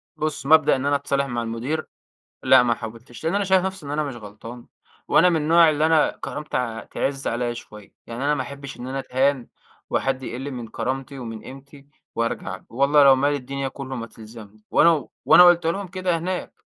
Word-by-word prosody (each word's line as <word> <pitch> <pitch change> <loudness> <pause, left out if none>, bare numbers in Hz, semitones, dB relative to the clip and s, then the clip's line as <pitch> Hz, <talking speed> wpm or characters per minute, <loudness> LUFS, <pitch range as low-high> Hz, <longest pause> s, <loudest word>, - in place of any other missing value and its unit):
بُص 155 -2 -3
مبدأ 155 -1 +5
إن 130 - -3
أنا 145 0 +2
أتصالح 140 0 0
مع 120 -3 -3
المدير، 120 +8 -3 0.6
لأ، - - +6
ما 120 -1 +2
حاولتش 115 +3 -10
لأن 165 +3 0
أنا 200 0 +1
شايف 190 -1 +3
نفسي 190 -5 -5
إن - - -6
أنا 150 +1 -1
مش 140 -4 -5
غلطان، 115 +2 -11 0.4
وأنا 180 - +5
من 170 - +2
النوع 165 +2 +5
اللي 155 +1 +1
أنا 160 -1 +3
كرامتي 125 -6 -4
تعِز 135 0 -2
عليَّ 120 0 -2
شويّة، 105 -3 -12
يعني 120 +3 -5
أنا 150 +1 +2
ما 135 - -2
أحبش 140 +2 -9
إن 125 - -6
أنا 135 +1 -4
أتهان 130 -1 0 0.4
وحد 135 -1 -1
يقِل 130 +3 -5
من 120 -4 -7
كرامتي 135 +4 -4
ومن 115 -3 -7
قيمتى 140 +1 -13 0.3
وارجَع، 115 0 -3
والله 140 +4 +4
لو 135 -1 +7
مال 145 +2 +1
الدنيا 140 0 -4
كلّه 135 0 -7
ما 115 -1 -5
تلزمني، 110 -2 -14
وأنا 155 -6 +4 0.2
وأنا 180 - +8
قُلت 175 -1 +5
لهم 195 +3 -2
كده 180 -1 -1
هناك 180 +2 -4
135 Hz, 195 wpm, -23 LUFS, 120-155 Hz, 0.6 s, وأنا